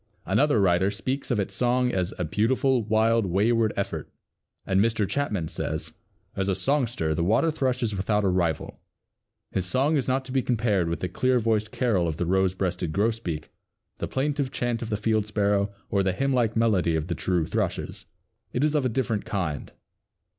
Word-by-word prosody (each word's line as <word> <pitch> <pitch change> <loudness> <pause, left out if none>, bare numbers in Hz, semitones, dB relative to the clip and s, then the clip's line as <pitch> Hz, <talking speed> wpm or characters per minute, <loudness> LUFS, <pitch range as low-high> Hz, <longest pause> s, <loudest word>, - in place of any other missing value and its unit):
Another 115 +6 +3
Writer 95 0 +3
speaks 130 +7 -3
of 120 -5 +1
its 100 - -2
song 125 0 +1
as 95 -1 -1
"a 90 - -1
beautiful, 125 - +2
wild, 110 0 +2
wayward 110 +4 +2
effort," - - -3 0.6
and 95 +1 +2
Mr. 110 -2 +1
Chapman 105 - -1
says, - - -4 0.4
"As 95 0 -1
a 95 - +1
songster 120 - 0
the 85 - -1
Water 115 - +3
thrush 130 -4 -1
is 110 -3 -1
without 105 +2 0
a - - +2
rival. 85 -4 -1 0.7
His 95 -1 -1
song 140 +8 +2
is 135 - -1
not 130 +1 0
to 130 - -8
be 135 0 +2
compared 105 -8 +1
with 85 - -3
the 90 - 0
clear 130 +8 +1
voiced 110 -2 0
carol 105 -9 +1
of 80 -2 -3
the 85 - -1
rose 95 +1 +2
breasted 90 -3 -2
grosbeak, 100 -7 -1 0.5
the - - -2
plaintive 140 0 -1
chant 120 -2 -2
of 115 - -4
the 105 - 0
field 110 0 0
sparrow, 100 -1 +1 0.2
or 100 - +3
the 95 -1 +1
hymnlike 125 -1 +1
melody 100 -8 +2
of 80 -1 -1
the 90 - -2
true 85 0 0
thrushes; - - -3 0.5
it 125 - 0
is 150 0 +2
of 150 -3 +2
a 130 - +1
different 110 -3 -1
kind. 85 - -3
105 Hz, 190 wpm, -26 LUFS, 95-125 Hz, 0.7 s, Another